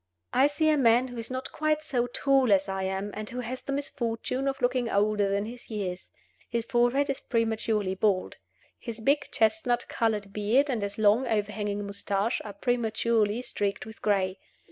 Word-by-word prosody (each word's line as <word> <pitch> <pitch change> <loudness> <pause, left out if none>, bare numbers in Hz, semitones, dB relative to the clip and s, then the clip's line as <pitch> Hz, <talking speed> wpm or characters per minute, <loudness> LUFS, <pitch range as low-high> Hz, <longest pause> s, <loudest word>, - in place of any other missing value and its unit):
I 265 +3 +5
see 295 +2 0
a 305 -2 +3
man 245 +1 +4
who 245 - -8
is 230 - -2
not 260 0 -4
quite 310 0 0
so 245 -5 0
tall 265 -1 +2
as 195 0 +4
I 195 0 -2
am, 190 +2 -2
and 215 0 -5
who 250 +1 -4
has 250 +2 -5
the - - -5
misfortune 260 -1 -2
of 270 0 -1
looking 245 -1 +1
older 205 -1 +2
than 200 +1 0
his 240 +2 -9
years. 190 -4 -4 0.4
His 235 -1 -1
forehead 245 +4 +2
is 275 -2 -2
prematurely 220 -4 0
bald. 190 -1 0 0.4
His 230 -2 -6
big 280 +6 +2
chestnut 220 +2 +1
colored 210 -3 -1
beard 235 +8 +2
and 235 -4 -1
his 200 0 -3
long 215 +4 +4
overhanging 210 -2 -1
mustache 200 +2 -1
are 205 - -7
prematurely 225 0 +1
streaked 200 -5 -2
with 220 0 -12
gray. 195 -2 +1
225 Hz, 180 wpm, -28 LUFS, 205-250 Hz, 0.4 s, I